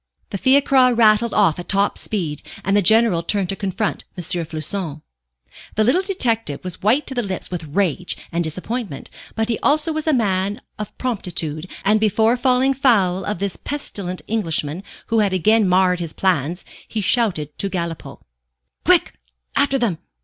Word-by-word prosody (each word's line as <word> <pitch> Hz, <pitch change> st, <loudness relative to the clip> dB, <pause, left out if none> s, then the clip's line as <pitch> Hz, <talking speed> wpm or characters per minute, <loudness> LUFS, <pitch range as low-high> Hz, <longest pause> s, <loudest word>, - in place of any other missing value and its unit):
The 195 Hz, -, -3 dB
fiacre 260 Hz, -1 st, +4 dB
rattled 225 Hz, 0 st, +4 dB
off 195 Hz, -7 st, +3 dB
at 175 Hz, -, -8 dB
top 200 Hz, +1 st, +1 dB
speed, 165 Hz, -9 st, -3 dB, 0.2 s
and 195 Hz, +2 st, +2 dB
the 205 Hz, -, +4 dB
General 220 Hz, -2 st, +4 dB
turned 195 Hz, +1 st, -1 dB
to 195 Hz, -, -1 dB
confront 200 Hz, +2 st, -2 dB
M. 175 Hz, -, -4 dB
Floçon. 165 Hz, -2 st, -3 dB, 0.7 s
The 215 Hz, -, +3 dB
little 255 Hz, -, +3 dB
detective 230 Hz, -, -1 dB
was 180 Hz, -2 st, -6 dB
white 240 Hz, +9 st, +2 dB
to -, -, -2 dB
the 245 Hz, -, 0 dB
lips 190 Hz, -5 st, -4 dB
with 170 Hz, -3 st, -4 dB
rage 180 Hz, +2 st, -1 dB
and 170 Hz, 0 st, 0 dB
disappointment; 185 Hz, -, -4 dB, 0.2 s
but 220 Hz, 0 st, 0 dB
he 230 Hz, -2 st, -1 dB
also 310 Hz, +2 st, +2 dB
was 310 Hz, 0 st, -3 dB
a -, -, +4 dB
man 200 Hz, -4 st, 0 dB, 0.2 s
of 210 Hz, -, -7 dB
promptitude, 180 Hz, -, -2 dB, 0.2 s
and 210 Hz, +2 st, +4 dB
before 220 Hz, +2 st, +3 dB
falling 255 Hz, +2 st, +2 dB
foul 200 Hz, -9 st, +2 dB
of 210 Hz, -, -3 dB
this 195 Hz, 0 st, -3 dB
pestilent 200 Hz, -11 st, -5 dB
Englishman, 165 Hz, -6 st, -2 dB, 0.3 s
who 230 Hz, -1 st, +2 dB
had 200 Hz, -3 st, +2 dB
again 215 Hz, +3 st, +3 dB
marred 180 Hz, 0 st, +3 dB
his 170 Hz, -2 st, -5 dB
plans, 175 Hz, -2 st, 0 dB, 0.2 s
he 220 Hz, -, -3 dB
shouted 180 Hz, -, 0 dB
to 195 Hz, -, 0 dB
Galipaud 170 Hz, -3 st, -5 dB, 0.6 s
"Quick! -, -, +3 dB, 0.4 s
After 275 Hz, -1 st, +3 dB
them! 225 Hz, -10 st, 0 dB
200 Hz, 165 wpm, -20 LUFS, 175-230 Hz, 0.7 s, fiacre